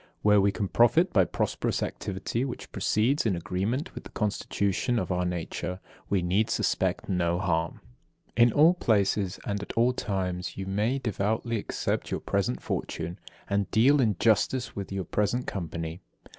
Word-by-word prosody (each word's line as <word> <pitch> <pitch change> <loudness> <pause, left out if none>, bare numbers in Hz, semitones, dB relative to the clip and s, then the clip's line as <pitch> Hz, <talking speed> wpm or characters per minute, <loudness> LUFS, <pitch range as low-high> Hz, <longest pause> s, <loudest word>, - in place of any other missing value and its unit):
Where 105 -1 +6
we 100 +1 +3
can 100 0 -2
profit 120 - +4
by 95 -5 +5
prosperous - - -1
activity 100 +5 -3
which 130 -2 -6
proceeds 120 +8 +1
in 105 -5 +1
agreement 100 - -2
with - - -8
the - - -10
constitution 105 +2 -1
of 110 - -1
our 90 0 0
nature, 90 +1 -3 0.3
we 95 -3 +1
need 95 +5 +1
suspect - - 0
no 85 -2 +1
harm. 85 -3 -1 0.5
54. 120 - +6
In - - +1
all 155 +8 +6
places, 100 - +1
and 100 -1 -2
at 100 - -6
all 120 +2 +3
times 90 -6 -3
you 95 - -4
may 105 +7 0
devoutly 110 0 -1
accept - - -2
your - - -2
present 60 - -1
fortune, 85 +2 -4 0.3
and 100 0 0
deal 135 +6 +5
in 110 -5 +2
justice 115 +4 +2
with 100 -1 -5
your 95 -2 -3
present 105 +8 0
company. 85 -1 -4
100 Hz, 165 wpm, -28 LUFS, 90-115 Hz, 0.5 s, Where